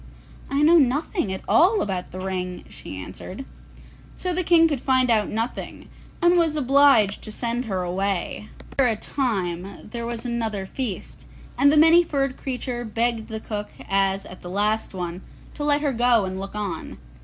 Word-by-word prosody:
'I 280 +2 +1
know 335 +3 +7
nothing 275 - 0
at 190 - -5
all 395 +6 +4
about 185 -3 -2
the 185 - -8
ring,' 185 -1 -4
she 95 - -9
answered. 185 - -8 0.7
So 365 -1 -2
the 365 +1 0
King 330 -1 +5
could 290 -6 -2
find 255 -2 +3
out 215 -2 +2
nothing, 225 +3 -4 0.3
and 345 0 +5
was 325 -2 +2
obliged 275 -7 +4
to 215 - -7
send 235 +3 -2
her 190 -4 -2
away. 195 +3 -2 0.2
After 270 -2 +3
a 225 - +2
time 195 -7 -3
there 235 -1 -4
was 235 0 -4
another 225 -5 -2
feast, 225 0 -5 0.3
and 285 +1 +5
the 305 - +3
Many 325 +3 +7
furred 275 -5 -1
Creature 250 -2 -4
begged 230 0 -1
the 220 0 -5
cook 210 -1 -5 0.2
as 195 0 +1
at 185 - -11
the 175 - -8
last 210 +2 0
one 175 0 -4 0.3
to 295 - -5
let 290 0 +2
her 285 -2 0
go 240 -3 +3
and 185 0 -4
look 195 +1 -7
on. 200 -6 -4
230 Hz, 180 wpm, -24 LUFS, 195-275 Hz, 0.7 s, know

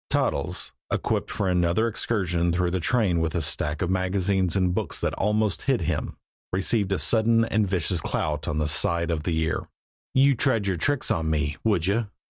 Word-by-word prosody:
Toddles, - - 0 0.2
equipped - - -1
for 100 -3 -2
another 90 +4 +2
excursion 90 -6 0
through 90 0 0
the 95 - 0
train 95 -2 +1
with 80 -1 -1
a 85 - +1
stack 75 +1 -1
of 90 - -1
magazines 95 -1 +1
and 90 -2 +2
books - - -1
that - - -1
almost 105 -1 0
hid - - +1
him, - - -2 0.3
received 95 +2 0
a 95 - +2
sudden 115 +2 +2
and 110 -2 +1
vicious 90 -2 -1
clout 75 0 -2
on 75 - -1
the 75 -1 0
side 85 +2 +2
of 80 -2 -1
the 80 0 -1
ear. 80 0 -1 0.5
"You'd 135 -1 +4
try 135 - +3
your 95 -2 0
tricks 145 - 0
on 80 -1 0
me, 75 -2 -1
would 100 -7 +2
you?" 105 +4 +1
90 Hz, 190 wpm, -25 LUFS, 80-105 Hz, 0.5 s, You'd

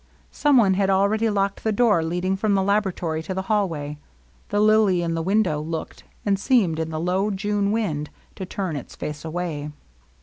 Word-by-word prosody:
Some 290 -2 +3
one 200 -5 +5
had 195 0 +1
already 200 +4 +2
locked 200 -1 -1
the 220 - +1
door 210 -6 +3
leading 180 +3 -1
from 200 +1 +1
the 195 - +2
laboratory 190 -5 0
to 185 +4 -5
the 190 - -2
hallway. 165 -9 -1 0.5
The 205 - 0
lily 210 -4 +4
in 165 -1 -1
the 165 - -1
window 185 -4 +1
looked, 160 +1 -6 0.2
and 200 -2 +1
seemed, 200 - +2
in 160 0 -2
the 155 -1 -4
low 185 +5 0
June 205 0 0
wind, 160 -10 -1 0.2
to 195 - -7
turn 185 -4 -3
its 140 - -7
face 150 0 -6
away. 160 -3 -4
190 Hz, 190 wpm, -23 LUFS, 165-205 Hz, 0.5 s, one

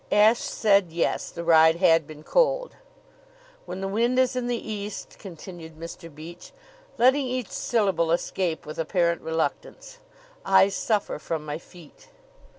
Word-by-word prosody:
Ashe 215 +3 +5
said 200 -5 +2
yes; 170 +1 -1
the 170 - -7
ride 160 -1 +6
had 165 -3 +3
been 155 -1 -11
cold. - - +1 0.9
"When 190 - -6
the 195 - -2
wind 235 +5 +1
is 255 -1 +2
in 250 -1 -2
the 245 -1 0
east," 210 -2 -6
continued 170 -3 -10
Mr. 165 0 -9
Beach, 160 +4 -11 0.5
letting 260 +2 +4
each 250 -3 -3
syllable 195 -8 0
escape 170 0 -1
with 155 +1 -8
apparent 170 0 +1
reluctance, 160 0 -4 0.4
"I 190 0 +5
suffer 205 -3 -1
from 155 0 -4
my 150 +1 -4
feet." 170 -3 -17
185 Hz, 145 wpm, -25 LUFS, 165-220 Hz, 0.9 s, ride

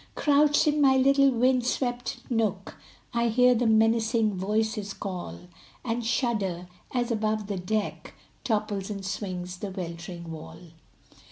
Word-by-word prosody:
Crouched 295 0 +4
in 300 -1 +2
my 265 -2 +5
little 275 +1 +5
wind 255 0 +2
swept 245 0 -2
nook, 210 -5 -1 0.4
I 235 0 +2
hear 250 +2 +5
the 240 0 +1
menacing 225 0 +3
voices 210 +2 -1
call, 180 - -6 0.4
And 235 0 -1
shudder, 215 -7 -1 0.2
as 245 -1 -1
above 215 -1 0
the 200 -1 -3
deck 210 +4 -3 0.3
Topples 210 -5 -1
and 200 -2 -5
swings 185 -2 -4
the 200 +2 -5
weltering 170 -2 -7
wall. 160 -1 -9
220 Hz, 135 wpm, -27 LUFS, 195-245 Hz, 0.4 s, my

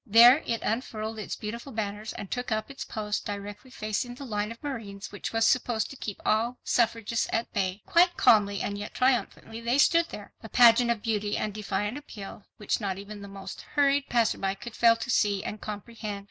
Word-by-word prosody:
There 235 +6 +8
it 230 - -1
unfurled 220 -1 -3
its 210 - -4
beautiful 235 +5 -6
banners 210 -1 -4
and 195 - -8
took 245 -1 -3
up 220 +5 -1
its 275 - -6
post 210 -1 -3
directly 205 +3 -6
facing 245 +1 -3
the 275 - -8
line 210 -2 -2
of 230 - -11
marines 210 -8 -6
which 205 - -5
was 225 0 +2
supposed 235 -3 +1
to - - -8
keep 210 -6 -6
all 230 +3 +1
suffragists 230 -1 +1
at 230 +1 -1
bay. 195 0 -1
Quite 350 +1 +4
calmly 200 -2 +4
and 205 0 -3
yet 205 - -7
triumphantly, 245 -3 0
they 235 +3 +1
stood 335 +4 +5
there, 205 - -9
a 220 - -9
pageant 240 +1 +6
of 230 -3 0
beauty 210 -3 0
and 210 - -2
defiant 210 +4 -2
appeal, 205 -8 -10
which 210 +2 -1
not 195 -2 -2
even 205 +1 -8
the 200 - -8
most 195 -1 -8
hurried 280 -1 +3
passerby 215 -5 +1
could 230 +3 -9
fail 230 -1 +6
to 230 +2 -6
see 205 -3 +2
and 210 - -5
comprehend. 210 0 -6
220 Hz, 200 wpm, -28 LUFS, 205-240 Hz, -, There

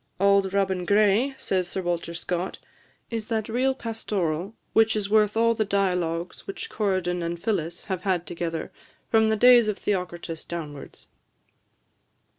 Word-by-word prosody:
"'Auld 200 0 +4
Robin 190 -2 0
Gray,'" 210 +7 +3
says 185 -8 -1
Sir 190 - -3
Walter 170 -1 -2
Scott, 175 +2 -3 0.5
"is 225 -2 -3
that 220 -3 -1
real 255 +4 +1
pastoral 200 -6 -3 0.2
which 225 0 +4
is 205 -1 -2
worth 215 0 +3
all 230 0 +4
the 220 -1 0
dialogues 180 -4 -1
which 195 - -6
Corydon 185 -4 0
and 170 0 -3
Phillis 170 -4 -2
have 190 -3 -3
had 180 -3 0
together, 165 -2 -4 0.4
from 220 -1 +4
the 220 - +3
days 240 0 +7
of 210 -2 -1
Theocritus 175 -4 -3
downwards." 150 -5 -8
195 Hz, 145 wpm, -25 LUFS, 175-220 Hz, 0.5 s, days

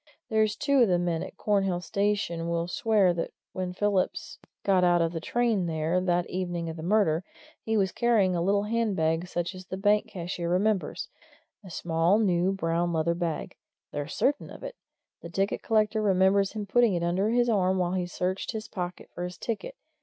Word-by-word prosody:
There's 220 -2 +2
two 280 -3 +2
of 235 - +6
the 180 -2 +3
men 175 -2 -1
at - - -8
Cornhill 195 -4 +1
station 180 -3 -1
will 170 0 -1
swear 200 -1 +2
that 170 -1 -4 0.2
when 185 -1 -3
Phillips 195 0 -1 0.2
got 190 -2 +3
out 175 -1 +4
of 165 -1 +1
the 165 - -2
train 225 -2 +1
there, 160 +2 0
that 175 -1 +1
evening 175 -2 -3
of 160 - -5
the - - -6
murder, 175 -2 +2 0.4
he 220 0 0
was 190 -2 +2
carrying 215 -7 +2
a 170 - 0
little 200 +3 +2
handbag 190 -7 0
such 175 +2 -3
as 185 0 -11
the 185 - -5
bank 205 +2 +2
cashier 175 -2 -4
remembers 195 +2 0 0.6
a 190 - -11
small, 165 +3 +1
new, 185 -4 +2
brown 170 -2 0
leather 165 0 +1
bag. 170 -2 -3 0.3
They're 145 -1 -4
certain 285 +2 0
of - - -11
it - - -6 0.5
the 170 - -8
ticket 195 +4 -1
collector 215 0 +1
remembers 195 0 +3
him 215 -2 -4
putting 230 0 +3
it 170 - -1
under 185 +5 +1
his 240 +1 +2
arm 190 -4 +2
while 180 -1 0
he 180 -1 -1
searched 185 +5 -2
his 220 0 -5
pocket 180 -4 -5
for 175 - -5
his 180 0 -5
ticket. 235 - -4
185 Hz, 190 wpm, -27 LUFS, 175-210 Hz, 0.6 s, of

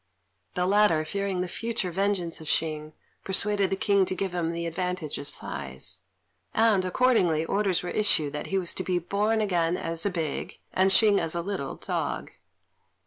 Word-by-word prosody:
The 180 - +1
latter, 190 -5 +3
fearing 195 +1 -2
the 180 - -2
future 225 -1 -2
vengeance 185 -3 -1
of 155 - -9
Hsing, 155 -1 -1 0.3
persuaded 200 0 +2
the - - 0
King 200 0 +2
to 185 - -1
give 195 0 -2
him 170 -2 -1
the 170 0 -4
advantage 175 -2 -3
of 140 - -6
size; 65 0 -4 0.5
and, 220 -4 +4
accordingly, 185 -6 +2
orders 195 -1 0
were 175 - -4
issued 160 -9 +3
that 150 - -4
he 195 - -1
was 180 -3 +1
to 185 - -4
be 185 -1 0
born 210 +5 0
again 175 -4 +1
as 165 0 -2
a 200 - +2
big, 165 -6 -4 0.2
and 190 +1 +3
Hsing 205 0 +6
as 165 0 0
a 170 - -2
little, 190 -8 -4
dog. - - -3
185 Hz, 180 wpm, -27 LUFS, 165-200 Hz, 0.5 s, Hsing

